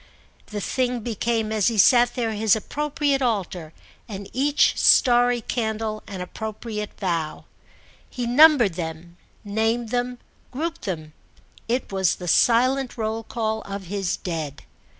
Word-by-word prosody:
The 210 Hz, -1 st, -5 dB
thing 250 Hz, +2 st, -1 dB
became 225 Hz, -1 st, -1 dB
as 215 Hz, -2 st, +1 dB
he 230 Hz, -2 st, 0 dB
sat 240 Hz, +4 st, +5 dB
there 230 Hz, -3 st, -1 dB
his 215 Hz, 0 st, +2 dB
appropriate 290 Hz, +4 st, -1 dB
altar 190 Hz, -9 st, -2 dB, 0.4 s
and 200 Hz, -1 st, -7 dB
each 285 Hz, +3 st, +3 dB
starry 245 Hz, -1 st, +4 dB
candle 220 Hz, -2 st, -3 dB
an 190 Hz, -2 st, -6 dB
appropriate 215 Hz, +2 st, -6 dB
vow. 165 Hz, -5 st, -2 dB, 0.6 s
He 245 Hz, -2 st, -4 dB
numbered 250 Hz, -, +6 dB
them, 170 Hz, 0 st, -7 dB, 0.3 s
named 225 Hz, +3 st, -1 dB
them, 245 Hz, +1 st, -2 dB, 0.3 s
grouped 330 Hz, +5 st, -4 dB
them—it 185 Hz, -, -6 dB
was 190 Hz, -2 st, +1 dB
the 180 Hz, -, -8 dB
silent 255 Hz, +7 st, +3 dB
roll 220 Hz, 0 st, -2 dB
call 220 Hz, -1 st, -3 dB
of 200 Hz, 0 st, -6 dB
his 190 Hz, 0 st, -2 dB
Dead. 155 Hz, -5 st, -5 dB
220 Hz, 130 wpm, -23 LUFS, 195-245 Hz, 0.6 s, numbered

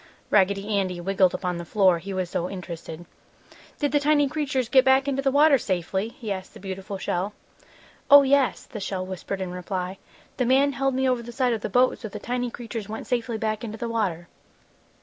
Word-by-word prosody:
Raggedy 200 Hz, +1 st, +2 dB
Andy 185 Hz, -2 st, -2 dB
wiggled 185 Hz, 0 st, +2 dB
upon 180 Hz, -1 st, -2 dB
the -, -, -5 dB
floor, 185 Hz, -1 st, +3 dB
he 195 Hz, +4 st, -7 dB
was 185 Hz, -1 st, -2 dB
so 175 Hz, 0 st, -2 dB
interested. 175 Hz, -3 st, -7 dB, 0.7 s
"Did 290 Hz, -3 st, 0 dB
the 290 Hz, -, +3 dB
tiny 290 Hz, 0 st, +3 dB
creatures 275 Hz, -4 st, -1 dB
get 260 Hz, +2 st, +5 dB
back 265 Hz, +1 st, +4 dB
into 275 Hz, -1 st, 0 dB
the 275 Hz, -, +2 dB
water 285 Hz, 0 st, +5 dB
safely?" 190 Hz, +1 st, -1 dB
he 235 Hz, -4 st, -7 dB
asked 190 Hz, -1 st, -5 dB
the -, -, -10 dB
beautiful 195 Hz, +1 st, -6 dB
shell. 190 Hz, +2 st, -2 dB, 0.8 s
"Oh, 285 Hz, 0 st, +10 dB
yes!" 275 Hz, -1 st, +2 dB
the 215 Hz, -, -8 dB
shell 190 Hz, -2 st, -3 dB
whispered 190 Hz, +1 st, -5 dB
in 185 Hz, -1 st, -3 dB
reply. 180 Hz, +1 st, -4 dB, 0.4 s
"The 250 Hz, -, +1 dB
man 275 Hz, +3 st, +4 dB
held 270 Hz, -1 st, 0 dB
me 265 Hz, 0 st, +1 dB
over 250 Hz, -2 st, +1 dB
the 235 Hz, +1 st, -9 dB
side 245 Hz, 0 st, +1 dB
of 220 Hz, -, -3 dB
the -, -, -3 dB
boat, 250 Hz, +5 st, +3 dB
so 225 Hz, -, -6 dB
the 210 Hz, -, -7 dB
tiny 245 Hz, +3 st, -2 dB
creatures 230 Hz, -3 st, -7 dB
went 220 Hz, +1 st, -6 dB
safely 240 Hz, -2 st, -1 dB
back 215 Hz, 0 st, -2 dB
into 220 Hz, -1 st, -5 dB
the 235 Hz, +1 st, -4 dB
water!" 185 Hz, -7 st, -1 dB
215 Hz, 210 wpm, -25 LUFS, 190-260 Hz, 0.8 s, Oh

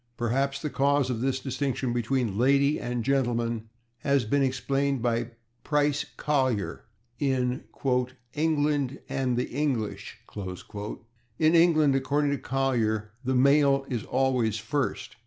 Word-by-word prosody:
Perhaps 135 Hz, +5 st, 0 dB
the 150 Hz, -, -2 dB
cause 140 Hz, -1 st, +2 dB
of 115 Hz, -2 st, -3 dB
this 130 Hz, 0 st, 0 dB
distinction 135 Hz, -2 st, -2 dB
between 120 Hz, -2 st, 0 dB
/lady/ 140 Hz, +6 st, +3 dB
and 120 Hz, -1 st, -2 dB
/gentleman/ 120 Hz, -4 st, 0 dB, 0.3 s
has 140 Hz, -2 st, +1 dB
been 140 Hz, +6 st, +1 dB
explained 135 Hz, 0 st, 0 dB
by 120 Hz, 0 st, 0 dB, 0.3 s
Price 145 Hz, -1 st, +1 dB
Collier 130 Hz, -8 st, 0 dB, 0.3 s
in 130 Hz, -2 st, 0 dB, 0.7 s
"England 145 Hz, -3 st, +1 dB
and 130 Hz, -2 st, -1 dB
the 125 Hz, -, -1 dB
English." 130 Hz, -6 st, -2 dB, 1.2 s
In 155 Hz, +1 st, +4 dB
England, 160 Hz, -4 st, +5 dB
according 140 Hz, +2 st, +1 dB
to 140 Hz, -, -1 dB
Collier, 115 Hz, -5 st, 0 dB
the 130 Hz, +1 st, 0 dB
male 140 Hz, +1 st, +4 dB
is 120 Hz, -5 st, -2 dB
always 125 Hz, -5 st, +1 dB
first. 130 Hz, +3 st, -3 dB
135 Hz, 120 wpm, -27 LUFS, 120-140 Hz, 1.2 s, England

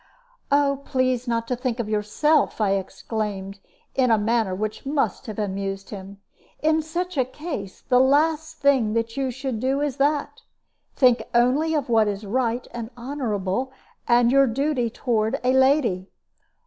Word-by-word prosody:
"Oh, 280 Hz, -1 st, +2 dB
please 255 Hz, -2 st, 0 dB
not 230 Hz, -1 st, -1 dB
to 250 Hz, -, 0 dB
think 245 Hz, -1 st, -3 dB
of 235 Hz, -, -2 dB
yourself," 220 Hz, +10 st, +1 dB
I 205 Hz, -3 st, +2 dB
exclaimed, 195 Hz, 0 st, -3 dB, 0.3 s
in 255 Hz, -2 st, +2 dB
a 225 Hz, -, +5 dB
manner 215 Hz, -2 st, +1 dB
which 215 Hz, +2 st, -4 dB
must 275 Hz, -1 st, -1 dB
have 215 Hz, -, -6 dB
amused 195 Hz, -1 st, -3 dB
him. 195 Hz, -1 st, -9 dB, 0.4 s
"In 315 Hz, +1 st, +2 dB
such 345 Hz, +2 st, -4 dB
a 260 Hz, -, +4 dB
case, 255 Hz, -, -7 dB
the 250 Hz, -2 st, +3 dB
last 315 Hz, +4 st, +2 dB
thing 265 Hz, -7 st, +3 dB
that 230 Hz, 0 st, -1 dB
you 270 Hz, -1 st, -1 dB
should 260 Hz, -2 st, -4 dB
do 265 Hz, +3 st, 0 dB
is 285 Hz, -2 st, -2 dB
that. 290 Hz, +1 st, 0 dB, 0.5 s
Think 250 Hz, -3 st, +4 dB
only 275 Hz, +7 st, +3 dB
of 290 Hz, -4 st, -1 dB
what 225 Hz, -3 st, +3 dB
is 205 Hz, +1 st, -3 dB
right 240 Hz, +2 st, -1 dB
and 235 Hz, -2 st, -6 dB
honorable, 245 Hz, -3 st, -2 dB, 0.4 s
and 240 Hz, 0 st, +4 dB
your 275 Hz, 0 st, +5 dB
duty 255 Hz, 0 st, 0 dB
toward 225 Hz, +1 st, -1 dB
a 255 Hz, +1 st, +3 dB
lady. 265 Hz, -8 st, +2 dB
245 Hz, 160 wpm, -24 LUFS, 215-275 Hz, 0.5 s, a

